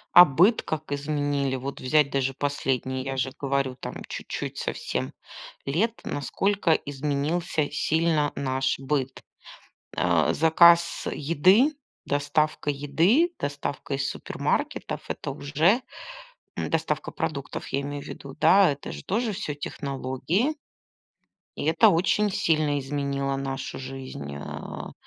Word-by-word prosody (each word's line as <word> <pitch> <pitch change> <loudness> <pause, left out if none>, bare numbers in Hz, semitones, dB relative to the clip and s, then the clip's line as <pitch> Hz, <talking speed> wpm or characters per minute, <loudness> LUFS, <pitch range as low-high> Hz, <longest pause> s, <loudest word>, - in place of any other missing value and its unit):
А 175 +1 +12
быт 180 - +4
как 155 -2 -5
изменили? 145 -2 -1
Вот 135 +2 -5
взять 145 +1 +3
даже 135 -1 0
последние, 130 -2 -1
я 135 0 -4
же 130 0 0
говорю, 140 -2 -1
там - - -6
чуть-чуть - - -5
совсем - - -3 0.5
лет. 205 +12 0
Насколько 190 +5 0
изменился 150 +3 -1
сильно 160 -1 +1
наш 135 -1 0
быт? 135 -1 -2 0.7
А. - - +3
Заказ 170 +1 +5
еды, 185 - +4 0.3
доставка 145 +1 0
еды, 165 - +2
доставка 145 0 -3
из 135 0 -1
супермаркетов- - - -2
это - - -4
уже 165 - +2 0.7
м, - - -3
доставка - - -1
продуктов, 140 -3 -4
я 140 - -1
имею 145 0 -5
в - - -11
виду. 140 -1 -9
Да, 185 +1 +6
это 140 0 -5
же - - -8
тоже 220 +3 0
всё 155 -6 -4
технологии. 145 - -2 1.0
И - - -5
это 160 +2 +5
очень 200 +5 +2
сильно 155 -5 +1
изменило 140 0 -2
нашу 135 0 -4
жизнь, 130 - -7
а. 70 - -7
145 Hz, 120 wpm, -26 LUFS, 135-165 Hz, 1.0 s, А